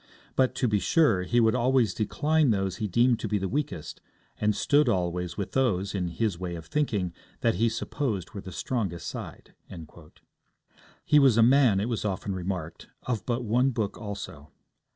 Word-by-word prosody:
But, 130 -1 +2
to 125 - +1
be 105 -2 +2
sure, 140 - +3
he 120 +7 +1
would 110 -1 +4
always 125 -4 +2
decline 150 +7 +1
those 95 -3 0
he 105 - -2
deemed 120 +4 +3
to - - -3
be 105 0 0
the 95 -1 -2
weakest, 130 - -4 0.4
and 105 0 +1
stood 145 +5 +3
always 90 -3 -1
with 100 - -4
those, 100 -8 0
in 95 -3 -1
his 95 +1 -2
way 90 -2 -4
of 80 -2 -8
thinking, 105 - -1 0.3
that - - +3
he 115 - +4
supposed 110 - -3
were 100 - -7
the 95 - -9
strongest 95 -5 -3
side.' - - -8 1.5
He 150 - +5
was 135 -5 +5
a 115 - +6
man, 125 -5 +5
it 100 - 0
was 115 -3 -2
often 100 -1 -2
remarked, 90 -3 -5 0.2
of 120 -4 -3
but 120 0 -1
one 120 +4 +2
book 110 -5 -2
also. 95 -8 -8
105 Hz, 180 wpm, -27 LUFS, 95-125 Hz, 1.5 s, a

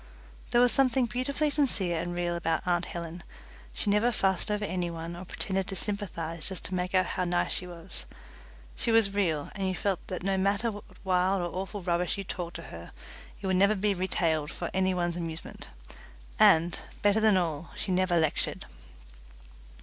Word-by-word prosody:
There 240 0 +4
was 245 -1 +6
something 260 -2 +3
beautifully 275 +6 -1
sincere 200 - +1
and 175 +1 -4
real 175 0 -1
about 165 +1 -1
aunt 175 -1 +1
Helen. 170 0 -6 0.5
She 200 - -1
never 215 +4 +3
fussed 195 -3 +1
over 210 0 0
any 180 -3 -2
one 165 0 -6
or 180 +2 -8
pretended 190 +1 -1
to 195 - -3
sympathize 170 -5 -1
just 190 -3 -6
to - - -5
make 180 +1 -1
out 185 - +4
how 185 - -2
nice 175 0 +1
she 180 - +1
was. 170 +1 -8 0.7
She - - 0
was 225 -3 +4
real, 165 -8 0
and 195 -2 -2
you 185 - -1
felt 195 -1 0
that 180 -1 -4
no 195 0 +1
matter 200 +4 +1
what 205 -1 -9 0.2
wild 185 0 +2
or 175 - -4
awful 195 +1 -4
rubbish 175 +1 0
you 200 - -3
talked 175 -2 -5
to 165 - -6
her 85 +1 -9 0.5
it - - -7
would 190 -1 +2
never 200 +3 +5
be 205 +1 +1
retailed 165 -5 0
for 175 - -5
any 190 0 +2
one's 175 -1 -1
amusement 165 -1 -5 0.7
and, 165 +2 +5 0.2
better 205 +1 +4
than 215 -3 +5
all, 165 -2 -1
she 195 - -2
never 185 -1 +2
lectured. 160 -3 0
185 Hz, 190 wpm, -29 LUFS, 170-200 Hz, 0.7 s, was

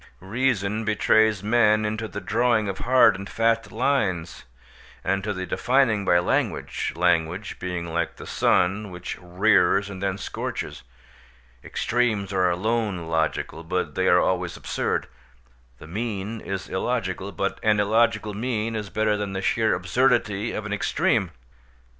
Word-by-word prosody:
Reason 110 0 -1
betrays 110 -1 +3
men 110 -1 +3
into 110 +1 -2
the 100 0 -6
drawing 115 -1 +1
of 95 -1 -4
hard 130 -2 +5
and 100 +1 -7
fast 115 0 +1
lines, 105 -9 -1 0.6
and 95 0 0
to 105 - -2
the 95 -2 -4
defining 120 -3 +2
by 90 - +4
language—language 90 +1 0
being 90 -2 -3
like 85 0 -2
the - - -10
sun, 100 +4 +1
which 90 0 -7
rears 95 +1 +2
and 95 -1 -8
then 100 -1 -1
scorches. - - -5 0.8
Extremes 110 -5 -1
are 90 -1 +3
alone 100 -1 -1
logical, 80 0 -1
but 90 +3 -2
they 95 0 0
are 90 - +6
always 90 -2 0
absurd; - - -2 0.7
the - - -12
mean 105 +3 -4
is 95 -1 -4
illogical, 95 -3 -2
but 100 0 -2
an 105 -1 +3
illogical 110 0 +2
mean 115 0 -2
is 105 -2 -4
better 110 0 +1
than 105 -1 -3
the 95 - -3
sheer 110 +1 +2
absurdity 110 +1 +1
of 110 - -4
an 105 - -3
extreme. 105 - +1
105 Hz, 140 wpm, -24 LUFS, 95-110 Hz, 0.8 s, are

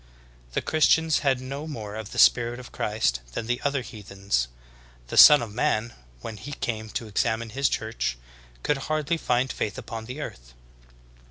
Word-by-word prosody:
The - - -1
Christians 160 0 +3
had 135 -3 +1
no 140 +4 -6
more 110 -9 -6
of 110 -1 -6
the - - -9
spirit 120 0 +4
of 125 - -11
Christ 105 - 0
than 110 - -3
the 120 +1 -1
other 140 -2 0
heathens. 100 - -3 0.6
The - - -4
Son 150 -4 +10
of 110 -3 -7
Man, 115 0 0 0.3
wdien 105 -2 -7
He 145 +8 -7
came 110 -4 -4
to 115 - -4
examine 110 +2 -1
His 135 +4 +1
Church, 110 - -2 0.5
could 145 - +1
hardly 155 +2 0
find 125 -3 0
faith 105 - -3
upon 115 -2 -7
earth. - - -8
115 Hz, 165 wpm, -26 LUFS, 110-140 Hz, 0.6 s, Son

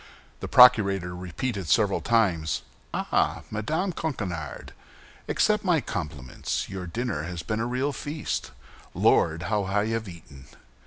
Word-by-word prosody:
The - - -5
procurator 100 -8 +6
repeated 90 +2 -4
several 105 -3 +3
times, 90 -10 +1 0.3
"Ah, - - 0
Madame 155 - -1
Coquenard! 95 - -4 0.6
Accept 210 0 +2
my 175 -4 +3
compliments; 75 - -4
your 95 -2 -6
dinner 115 -3 -2
has 85 +1 -5
been 110 0 -2
a 115 - -1
real 130 +4 -1
feast. 150 +3 -4 0.5
Lord, 80 0 +3
how 105 +4 0
I 100 +3 0
have 115 -1 -2
eaten!" 75 -6 -13
105 Hz, 125 wpm, -26 LUFS, 85-125 Hz, 0.6 s, procurator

